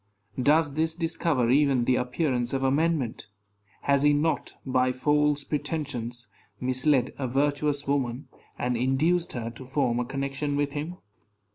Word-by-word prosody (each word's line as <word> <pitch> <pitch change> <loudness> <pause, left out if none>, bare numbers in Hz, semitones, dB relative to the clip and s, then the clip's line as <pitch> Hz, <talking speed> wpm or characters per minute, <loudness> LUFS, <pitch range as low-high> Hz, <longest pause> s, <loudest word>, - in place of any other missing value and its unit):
Does 145 +1 +3
this 160 +2 0
discover 160 -7 0
even 135 -3 +3
the 130 - +3
appearance 125 -1 -1
of 135 0 -1
amendment? 140 -4 0 0.6
Has 140 -1 +3
he 145 0 +5
not, 155 +3 0
by 130 -1 +2
false 145 +2 +2
pretensions, 130 -6 -3 0.3
misled 130 0 +2
a 130 - -1
virtuous 145 +2 0
woman, 135 -2 -1 0.3
and 125 0 -1
induced 150 +8 +1
her 115 -2 -4
to 120 +3 -11
form 130 -2 0
a 125 - -1
connection 140 +2 -2
with 145 0 0
him? 155 +4 -4
140 Hz, 140 wpm, -27 LUFS, 125-150 Hz, 0.6 s, he